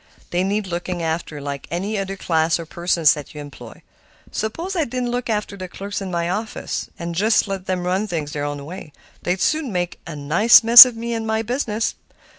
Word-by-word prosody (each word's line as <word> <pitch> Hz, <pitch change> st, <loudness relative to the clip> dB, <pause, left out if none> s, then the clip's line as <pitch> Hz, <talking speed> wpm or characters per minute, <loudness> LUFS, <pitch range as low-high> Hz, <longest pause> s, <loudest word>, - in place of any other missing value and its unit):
They 175 Hz, +1 st, +1 dB
need 200 Hz, +2 st, -1 dB
looking 175 Hz, -1 st, -4 dB
after, 160 Hz, -2 st, -3 dB
like 140 Hz, -1 st, -6 dB
any 190 Hz, +7 st, -3 dB
other 195 Hz, -1 st, -3 dB
class 160 Hz, -2 st, +1 dB
of 165 Hz, -1 st, -9 dB
persons 170 Hz, -2 st, +3 dB
that 150 Hz, 0 st, -9 dB
you -, -, -7 dB
employ. 145 Hz, -1 st, -11 dB, 0.5 s
Suppose 330 Hz, -, -4 dB
I 335 Hz, -, +1 dB
didn't 250 Hz, -2 st, -3 dB
look 245 Hz, 0 st, -3 dB
after 210 Hz, -2 st, -2 dB
the 185 Hz, -1 st, -7 dB
clerks 200 Hz, +3 st, -6 dB
in 195 Hz, -, -5 dB
my 170 Hz, -1 st, -2 dB
office, 215 Hz, +5 st, -4 dB, 0.2 s
just 210 Hz, +6 st, +2 dB
let 195 Hz, -1 st, -5 dB
them 185 Hz, -1 st, -2 dB
run 190 Hz, +4 st, 0 dB
things 160 Hz, -6 st, -4 dB
their 145 Hz, -1 st, -4 dB
own 145 Hz, -1 st, -4 dB
way; 165 Hz, -2 st, -9 dB, 0.3 s
they'd 180 Hz, +1 st, -1 dB
soon 305 Hz, -, 0 dB
make 175 Hz, -2 st, -3 dB
a 165 Hz, -, -6 dB
nice 170 Hz, +12 st, +5 dB
mess 235 Hz, +2 st, +12 dB
of 250 Hz, -2 st, -5 dB
me 235 Hz, +1 st, -4 dB
and 225 Hz, -1 st, -3 dB
my 220 Hz, 0 st, 0 dB
business." 230 Hz, -2 st, -2 dB
185 Hz, 205 wpm, -21 LUFS, 165-220 Hz, 0.5 s, mess